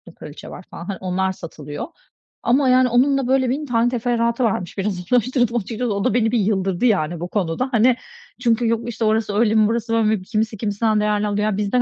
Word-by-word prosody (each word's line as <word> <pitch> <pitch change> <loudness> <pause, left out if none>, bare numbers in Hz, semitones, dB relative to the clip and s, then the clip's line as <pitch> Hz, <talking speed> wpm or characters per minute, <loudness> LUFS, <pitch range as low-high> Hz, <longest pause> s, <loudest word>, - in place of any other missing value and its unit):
kraliçe 150 0 -10
var 185 - -10
falan, 170 - -8
hani, 195 0 -4
onlar 190 0 -1
satılıyor 150 -5 -7 0.6
ama, 260 +2 +3
yani, 255 0 +4
onun 260 +4 +3
da, 270 -2 -1
böyle, 260 -1 +2
1000 285 +4 -2
tane 240 -2 +1
teferruatı 235 0 0
varmış, 190 -6 -1
biraz 190 -2 -2
araştırdım 245 0 +2
açıkçası. 225 +1 -2
O 200 0 -2
da - - +1
beni 225 -2 +2
bir 240 - +2
yıldırdı, 195 0 0
yani, 175 -7 +1
bu 175 - -4
konuda. 195 +6 -2
Hani, 240 +1 +4 0.5
çünkü 235 -1 +2
yok, 230 +1 -1
işte, 230 -1 -2
orası 215 -1 +1
öyle 220 0 +2
mi, 215 -1 +5
burası 230 +1 -2
böyle 225 -1 +2
mi, 215 -2 +1
kimisi 220 +2 -2
kimisinden 215 +1 0
değerli 210 0 +1
alıyor. 205 0 -1
Ya 215 -2 0
bizden 210 +4 +1
220 Hz, 215 wpm, -21 LUFS, 200-240 Hz, 0.6 s, mi